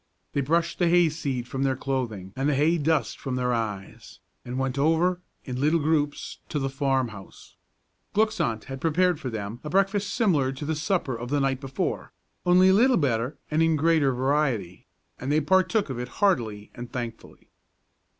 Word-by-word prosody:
They 140 - +1
brushed 165 +5 0
the 175 - +3
hay 175 -1 +5
seed 140 -6 -3
from 135 +1 -4
their 135 -1 +1
clothing 120 -9 -3
and 135 +2 0
the 145 - +2
hay 160 +5 +3
dust 150 -4 0
from 130 -2 -3
their 125 -1 0
eyes, 105 -4 -5 0.3
and 125 +1 -5
went 135 0 -1
over, 165 +4 +2 0.2
in 125 -1 -4
little 155 +3 +3
groups, 150 -1 -1
to - - -2
the 135 -1 -1
farm 135 -2 0
house. 100 -3 -13 0.6
Glück's 215 +1 +2
aunt 110 -2 -1
had 135 0 -8
prepared 175 +1 +2
for 130 - -4
them 110 0 -5
a 150 - -5
breakfast 195 +3 +1
similar 165 - +2
to 135 +3 -6
the 160 - -1
supper 155 - -1
of 120 +1 -6
the 145 +1 +1
night 135 -1 0
before, 135 -1 -3 0.4
only 180 +1 +6
a - - +6
little 245 +5 +5
better 125 -3 0
and 155 +1 +2
in 165 -1 +3
greater 155 -2 +3
variety, 130 - -1 0.3
and 135 - -3
they 150 - +4
partook 190 +3 +2
of 125 - -4
it 125 - -4
heartily 115 - 0
and 120 -1 -8
thankfully. 120 -2 -7
140 Hz, 190 wpm, -26 LUFS, 125-165 Hz, 0.6 s, only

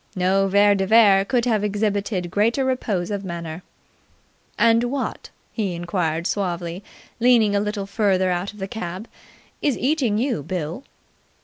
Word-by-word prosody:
No 190 +1 +2
Vere 205 +1 +4
de 195 -1 -1
Vere 205 -3 +6
could 240 +3 0
have 220 -4 +1
exhibited 205 -3 -1
greater 230 +7 +1
repose 210 -8 -1
of 200 -1 -3
manner. 170 -2 -6 1.0
"And 230 +1 +4
what," 265 +2 -4 0.2
he 200 -6 -2
inquired 170 -2 -2
suavely, 175 -2 -3 0.4
leaning 230 -4 +4
a - - +3
little 210 -1 -3
further 195 -3 +1
out 180 +2 -2
of 210 - -17
the 195 -1 -4
cab, 190 0 -6 0.5
"is 285 -4 +1
eating 260 -6 +1
you, 240 - -1
Bill?" 175 - -4
200 Hz, 145 wpm, -22 LUFS, 180-225 Hz, 1.0 s, Vere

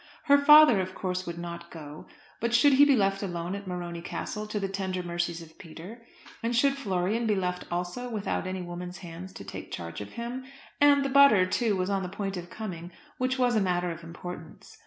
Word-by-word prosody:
Her 285 -1 +5
father, 300 -7 +8
of 185 0 -6
course, 185 -1 -3
would 170 0 -5
not 170 0 -7
go; 150 -2 -10 0.3
but 235 +1 0
should 275 +4 +6
he 280 +2 +7
be 280 -2 +5
left 195 -3 +1
alone 175 -2 -3
at 200 -1 -6
Morony 175 -2 -5
Castle 215 +4 -5
to 210 0 -3
the 195 - -1
tender 190 -1 -3
mercies 175 -1 -3
of 160 0 -17
Peter? 175 +7 -10 0.4
and 235 +1 -1
should 275 +3 +4
Florian 215 -2 -1
be 210 - +2
left 180 -1 -2
also 180 +8 -3
without 210 -4 -2
any 185 -1 -4
woman's 175 +1 -7
hands 175 +3 -8
to - - -9
take - - -8
charge 85 +2 -6
of 105 - -9
him? 240 +2 -5 0.4
And 285 -1 +5
the - - 0
butter, 275 -9 +6
too, 215 +3 +1
was 185 +1 -1
on 195 -1 0
the 180 - -4
point 195 0 -4
of 175 -1 -7
coming, 180 -4 -7 0.3
which 255 +1 0
was 245 -2 +2
a 215 - +3
matter 180 -2 0
of 165 0 -8
importance. 170 -1 -10
190 Hz, 215 wpm, -28 LUFS, 175-235 Hz, 0.4 s, father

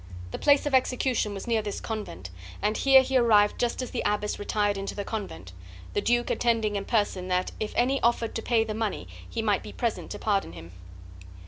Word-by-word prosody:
The - - -5
place 285 -1 +4
of 290 - -2
his 260 - +8
execution 250 -5 -1
was 195 - -6
near 230 -2 +1
this 205 -1 -4
convent, 95 - -6 0.3
and 210 +1 0
here 270 -1 +6
he 265 0 +1
arrived 210 -4 +4
just 240 +1 0
as 255 - -7
the 245 - -2
abbess 210 0 -1
retired 205 0 0
into 195 0 -4
the 200 - -4
convent; 95 - -6 0.4
the 205 - +1
duke 240 +2 +1
attending 225 -3 +1
in 200 0 -2
person, 205 -5 0
that, 180 0 0
if 215 - -3
any 265 +3 +2
offered 235 -1 +1
to - - -3
pay 225 -1 +2
the 220 - -4
money, 210 - -3 0.2
he 225 - -3
might 205 -3 +2
be - - -9
present 235 -2 -3
to - - -5
pardon 200 - -1
him. 85 0 -11
215 Hz, 215 wpm, -27 LUFS, 205-240 Hz, 0.4 s, his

